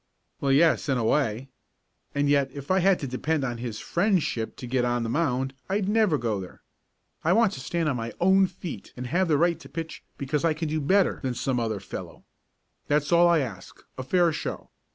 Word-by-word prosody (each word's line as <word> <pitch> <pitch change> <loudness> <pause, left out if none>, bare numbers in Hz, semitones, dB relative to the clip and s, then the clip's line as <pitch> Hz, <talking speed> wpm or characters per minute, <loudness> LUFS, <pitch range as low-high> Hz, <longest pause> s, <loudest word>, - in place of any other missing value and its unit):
"Well, 140 - +1
yes, 155 +2 +3
in 135 - +2
a 120 - 0
way. 125 0 0 0.7
And 145 0 +2
yet 140 -1 +3
if 140 +4 -5
I 190 - +4
had 190 0 +4
to - - -2
depend 145 +4 -1
on 120 -3 -3
his 115 -3 -5
friendship 175 - 0
to - - -8
get 125 0 0
on 120 -1 0
the 115 - -3
mound 135 -2 0 0.2
I'd 195 0 0
never 210 -6 +3
go 115 -5 -1
there. 90 - -11 0.6
I 170 - +3
want 225 -2 +4
to - - -6
stand 165 +5 -2
on 140 -4 0
my 115 0 -4
own 190 +2 +5
feet 170 - -8
and 125 - -5
have 180 +9 +1
the 155 -3 +3
right 170 +1 +2
to - - -13
pitch 165 -1 -6 0.2
because 140 +1 -2
I 165 -2 +2
can 160 0 -3
do 155 0 -1
better 190 +6 +2
than 130 -2 -2
some 125 0 -1
other 110 -3 -2
fellow. 95 - -8 0.6
That's 145 +1 +1
all 170 0 +6
I 170 -3 +4
ask 115 -9 -7 0.2
a - - -5
fair 170 +5 +2
show. - - -5
145 Hz, 215 wpm, -26 LUFS, 125-170 Hz, 0.7 s, all